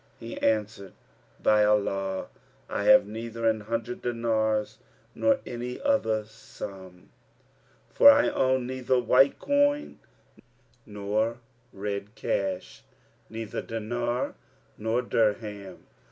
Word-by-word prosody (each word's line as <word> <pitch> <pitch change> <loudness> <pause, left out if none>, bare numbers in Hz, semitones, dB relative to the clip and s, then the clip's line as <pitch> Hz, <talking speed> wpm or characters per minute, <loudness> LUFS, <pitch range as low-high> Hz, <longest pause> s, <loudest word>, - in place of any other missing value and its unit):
He 115 0 -7
answered, 105 -3 -1 0.5
"By 105 0 +5
Allah, 100 -2 0 0.4
I - - -3
have - - +7
neither 115 +2 -4
an 110 -1 +2
hundred 115 +3 -4
dinars, 110 -2 -1 0.3
nor 280 -1 +2
any 120 +1 -5
other 270 - +1
sum; 95 -4 -11 0.8
for 285 - +9
I 285 +1 +5
own 130 -1 +1
neither 130 0 0
white 125 +3 +4
coin 285 +1 +1 0.9
nor 105 +3 -1 0.3
red 100 +1 -5
cash, 95 -2 -3 0.5
neither 110 -1 -5
dinar 120 +2 -3 0.4
nor 110 +3 -1
dirham. 105 -4 -2
110 Hz, 100 wpm, -27 LUFS, 105-120 Hz, 0.9 s, for